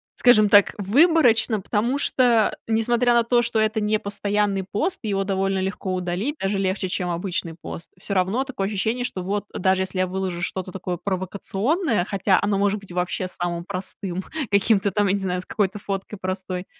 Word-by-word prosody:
скажем 215 -4 +5
так, 205 -1 +6
выборочно. 230 - +3
Потому 230 +7 0
что, 240 -6 +2
несмотря 235 +2 +2
на 235 0 +4
то, 240 +1 +3
что 240 -1 -1
это 220 0 +2
непостоянный 205 -2 0
пост, 350 - -1
его 200 -3 0
довольно 195 0 0
легко 190 0 -3
удалить, 185 - -2
даже 195 +1 0
легче, 190 0 -1
чем 180 0 -2
обычный 170 -1 -3
пост. 170 - -8
Всё 195 +2 -5
равно 190 +8 +1
такое 255 -8 -3
ощущение, 220 +5 -1
что, 185 - -3
вот, 200 +3 -2
даже 190 0 +2
если 185 0 -4
я 185 - +2
выложу 185 -1 -3
что-то 185 +1 -3
такое 180 -1 -4
провокационное, 200 - -1
хотя 195 0 +1
оно 205 -1 +1
может 200 +1 +1
быть 195 - -14
вообще 180 +1 -2
самым 175 -1 -3
простым, 185 0 -5 0.3
каким-то 200 0 +3
там, 205 +2 +1
я 190 - +2
не 200 - 0
знаю, 180 -1 -1
с - - -6
какой-то 205 0 -1
фоткой 195 +1 -5
простой. 185 -1 -3
200 Hz, 180 wpm, -23 LUFS, 185-220 Hz, 0.3 s, так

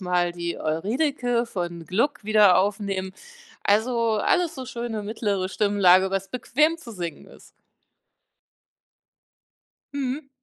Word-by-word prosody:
mal 180 -1 0
die 170 0 -4
Euridice 240 - 0
von 175 -4 -5
Gluck 230 - 0
wieder 210 -4 +5
aufnehmen. 195 -1 -1 0.5
Also, 230 +2 +2
alles 335 - +1
so 260 - -6
schöne 235 -4 -4
mittlere 205 -3 -2
Stimmlage, 190 -2 +4
was 195 0 -2
bequem 300 +7 +1
zu 320 -8 -12
singen 175 -7 -6
ist. - - -17 2.4
Mhm. 275 +1 -3
210 Hz, 110 wpm, -24 LUFS, 185-245 Hz, 2.4 s, wieder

